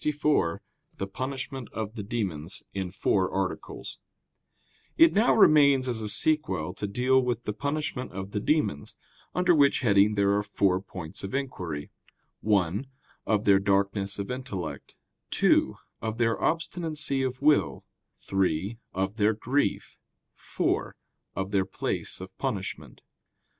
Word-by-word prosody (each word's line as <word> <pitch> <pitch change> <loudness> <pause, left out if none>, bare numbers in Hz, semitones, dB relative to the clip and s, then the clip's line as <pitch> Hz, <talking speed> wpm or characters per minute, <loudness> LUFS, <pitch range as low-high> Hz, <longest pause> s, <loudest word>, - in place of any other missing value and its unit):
_______________________ - - -11
QUESTION 150 - +2
64 145 - +1 0.4
THE 95 - -2
PUNISHMENT 130 +4 -5
OF 110 -1 -4
THE 110 - -5
DEMONS 95 -6 -3
(In 95 -2 -3
Four 95 +1 +1
Articles) 95 -1 -4 1.0
It 330 0 +7
now 215 +4 +4
remains 140 -9 +6
as 120 -3 -1
a 105 - -3
sequel 95 - +1
to 105 +2 -4
deal 125 +5 +3
with 120 -2 -2
the 105 - -3
punishment 140 +2 -3
of 95 +1 -6
the 105 - -1
demons; 130 - 0 0.4
under 180 0 +4
which 140 -4 +4
heading 105 -3 +4
there 100 0 +3
are 100 - +2
four 100 -2 +1
points 90 -4 -8
of 95 +6 -4
inquiry: 90 - -4 0.5
(1) 100 +3 +1 0.4
Of 105 0 +1
their 100 -1 +6
darkness 100 0 0
of 100 +2 -4
intellect; 125 -8 -6 0.3
(2) - - +3 0.3
Of 110 0 -3
their 115 -1 +1
obstinacy 155 -4 -1
of 130 -1 -2
will; 145 - +3 0.3
(3) 95 +3 -1 0.2
Of 95 +3 -2
their 105 0 +3
grief; 115 +1 -1 0.3
(4) - - -2 0.4
Of 95 +1 -3
their 95 -2 +2
place 95 - -3
of - - -10
punishment. - - -4
105 Hz, 140 wpm, -27 LUFS, 95-135 Hz, 1.0 s, It